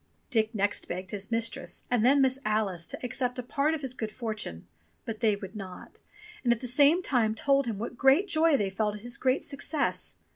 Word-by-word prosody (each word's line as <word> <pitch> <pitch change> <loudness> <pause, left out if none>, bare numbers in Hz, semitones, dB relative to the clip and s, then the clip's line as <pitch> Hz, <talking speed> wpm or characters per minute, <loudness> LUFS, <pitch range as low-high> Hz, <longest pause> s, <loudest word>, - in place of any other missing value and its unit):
Dick 220 -1 +2
next 205 0 0
begged 185 +2 -5
his 200 -2 -3
mistress, 230 0 -2
and 245 -3 +3
then 275 +3 +5
Miss 265 0 +2
Alice, 210 -6 -1
to - - -4
accept 250 0 -2
a 250 - -3
part 285 +5 +1
of 310 - -6
his 265 -3 -3
good 220 -4 -4
fortune, 215 - -5 0.4
but 220 -1 -5
they 220 -3 +3
would 200 +1 -9
not, 190 -3 -9 0.4
and 240 - +3
at 235 - +2
the 255 - -6
same 285 +8 +4
time 225 -7 +1
told 275 +2 +2
him 220 -3 -2
what 235 +3 -6
great 275 +9 +5
joy 320 -3 +4
they 200 -5 -1
felt 210 +1 -1
at 210 - -9
his 245 +4 -5
great 260 +2 +1
success. 285 +1 -1
235 Hz, 215 wpm, -29 LUFS, 215-270 Hz, 0.4 s, then